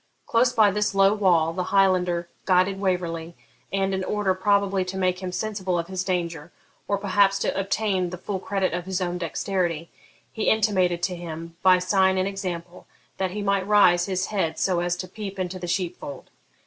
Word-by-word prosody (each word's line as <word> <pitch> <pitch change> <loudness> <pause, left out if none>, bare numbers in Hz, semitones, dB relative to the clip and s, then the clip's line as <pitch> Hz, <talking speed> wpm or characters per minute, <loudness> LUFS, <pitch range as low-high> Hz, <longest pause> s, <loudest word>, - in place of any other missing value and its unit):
Close 235 +2 +3
by 220 -4 +4
this 210 0 -1
low 195 +1 +5
wall 175 -6 +2
the 180 +1 -2
Highlander 180 -3 +2 0.2
guided 190 +1 +2
Waverley, 175 -3 -2 0.4
and, 195 0 0
in 190 0 -1
order 205 -1 0
probably 200 0 +1
to 185 +1 -5
make 185 -1 0
him 185 -1 -4
sensible 190 -2 -2
of 170 - -1
his 185 -1 -2
danger, 170 -3 -3 0.4
or 200 - +1
perhaps 195 0 +3
to - - -1
obtain 195 -2 0
the 180 - -6
full 190 +2 -4
credit 190 -1 -1
of 175 +1 -4
his 190 -1 -1
own 180 -1 -2
dexterity, 170 -1 -2 0.4
he 220 - 0
intimated 185 -5 +2
to 185 -1 0
him, 165 -1 -7
by 185 -1 +6
sign 190 +1 +2
and 185 +1 +1
example, 180 -3 -6 0.3
that 190 -1 0
he 205 +3 -4
might 200 -1 0
raise 180 -4 +5
his 190 -1 -1
head 165 -5 0
so 185 -3 +1
as 175 0 -1
to 185 - -5
peep 200 +1 -7
into 185 0 -3
the 175 - -5
sheep 180 0 -1
fold. 140 - -9
185 Hz, 190 wpm, -24 LUFS, 175-195 Hz, 0.4 s, by